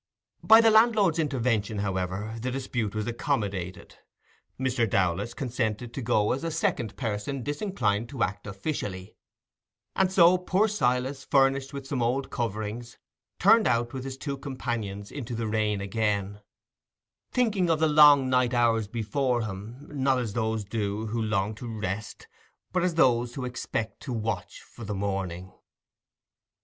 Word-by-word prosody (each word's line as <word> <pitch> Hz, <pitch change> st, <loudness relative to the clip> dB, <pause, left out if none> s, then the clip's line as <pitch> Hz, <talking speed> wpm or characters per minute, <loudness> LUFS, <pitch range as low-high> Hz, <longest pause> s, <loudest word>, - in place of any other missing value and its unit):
By 220 Hz, +1 st, +8 dB
the 225 Hz, -1 st, +5 dB
landlord's 215 Hz, -6 st, +4 dB
intervention, 120 Hz, -8 st, 0 dB
however, 100 Hz, +2 st, -2 dB
the 130 Hz, -, -2 dB
dispute 125 Hz, -5 st, -3 dB
was 105 Hz, -1 st, -1 dB
accommodated. 100 Hz, -6 st, -3 dB, 0.6 s
Mr. 130 Hz, -4 st, +1 dB
Dowlas 95 Hz, +5 st, 0 dB
consented 120 Hz, -3 st, -2 dB
to 135 Hz, -, -4 dB
go 110 Hz, -3 st, +2 dB
as 135 Hz, +5 st, -2 dB
a 165 Hz, -, -1 dB
second 125 Hz, -8 st, -1 dB
person 120 Hz, +3 st, -3 dB
disinclined 125 Hz, -, -1 dB
to 130 Hz, -4 st, -1 dB
act 105 Hz, +2 st, -3 dB
officially; 100 Hz, -3 st, -5 dB, 0.8 s
and 190 Hz, -1 st, +2 dB
so 180 Hz, -1 st, +6 dB
poor 190 Hz, +4 st, +2 dB
Silas, 135 Hz, -, 0 dB
furnished 135 Hz, 0 st, +2 dB
with 140 Hz, -2 st, -7 dB
some 135 Hz, -2 st, -2 dB
old 125 Hz, +4 st, 0 dB
coverings, 115 Hz, +1 st, -4 dB, 0.4 s
turned 220 Hz, +3 st, +5 dB
out 120 Hz, 0 st, +1 dB
with 130 Hz, -1 st, -5 dB
his 135 Hz, 0 st, -6 dB
two 140 Hz, 0 st, -4 dB
companions 115 Hz, -7 st, -4 dB
into 125 Hz, -4 st, -5 dB
the 115 Hz, 0 st, -2 dB
rain 105 Hz, -2 st, 0 dB
again, 100 Hz, 0 st, -1 dB, 0.9 s
thinking 210 Hz, -8 st, +1 dB
of 165 Hz, -, +3 dB
the 160 Hz, +1 st, +3 dB
long 150 Hz, -3 st, +7 dB
night 125 Hz, -1 st, +2 dB
hours 115 Hz, -3 st, +2 dB
before 120 Hz, +3 st, -1 dB
him, 110 Hz, +7 st, -7 dB
not 135 Hz, -2 st, +2 dB
as 120 Hz, -5 st, -3 dB
those 110 Hz, -2 st, -1 dB
do 105 Hz, 0 st, -2 dB
who 115 Hz, +1 st, -2 dB
long 105 Hz, -1 st, 0 dB
to 115 Hz, +3 st, -8 dB
rest, 105 Hz, -, -5 dB, 0.5 s
but 185 Hz, -, +2 dB
as 175 Hz, -1 st, 0 dB
those 120 Hz, -5 st, +3 dB
who 130 Hz, -, -4 dB
expect 115 Hz, -3 st, -4 dB
to 135 Hz, -, -6 dB
"watch 110 Hz, -3 st, -4 dB
for 115 Hz, -, -13 dB
the 105 Hz, -1 st, -4 dB
morning". 95 Hz, -2 st, -3 dB
120 Hz, 150 wpm, -27 LUFS, 105-135 Hz, 0.9 s, By